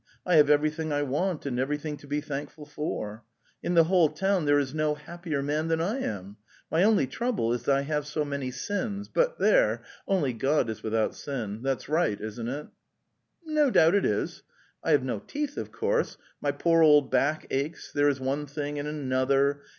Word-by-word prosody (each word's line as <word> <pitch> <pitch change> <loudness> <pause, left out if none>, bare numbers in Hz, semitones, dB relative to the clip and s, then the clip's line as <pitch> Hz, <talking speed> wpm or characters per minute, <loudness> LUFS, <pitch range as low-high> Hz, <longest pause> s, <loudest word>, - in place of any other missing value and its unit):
I 180 -3 +4
have 150 -1 +6
everything 155 +1 +2
I 145 0 +1
want 150 +5 -1
and 125 -3 -2
everything 150 +3 -2
to 145 - -15
be 145 +1 -1
thankful 145 0 -6
for. 115 -7 -5 0.4
In 175 - -1
the 165 - +7
whole 170 -2 +4
town 190 +2 0
there 145 0 +4
is 140 -2 -1
no 155 -1 +1
happier 155 -1 -4
man 150 +3 -1
than 165 0 +1
Iam. 110 - -3 0.3
My 165 - +3
only 210 -7 +4
trouble 170 - -1
is 120 +3 -3
I 140 0 +4
have 150 0 -2
so 150 0 -1
many 140 -2 -3
sins, 205 - -3
but - - +1
there - - +3
— - - -27
only 175 -10 +1
God 135 +1 +1
is 110 0 -8
without 110 0 0
sin. 115 -7 -5
That's 135 -1 -2
right, 155 -9 +1
isn't 110 +2 -5
it?" 145 +4 -4 0.5
'" - - -46
No 305 -2 +3
doubt 165 -7 +5
it 200 - +3
is." - - -1 0.4
'"'T - - -2
have - - +4
no - - -2
teeth, 290 -1 -4
of - - -5
course; 470 +1 0 0.2
my - - +1
poor 165 -1 +2
old 150 -3 +6
back 140 +4 +1
aches; 140 +4 -3
there 145 0 +4
is 140 -2 -1
one 140 +3 -2
thing 145 0 -4
and 145 - -3
another 140 0 +1
150 Hz, 195 wpm, -27 LUFS, 135-165 Hz, 0.5 s, the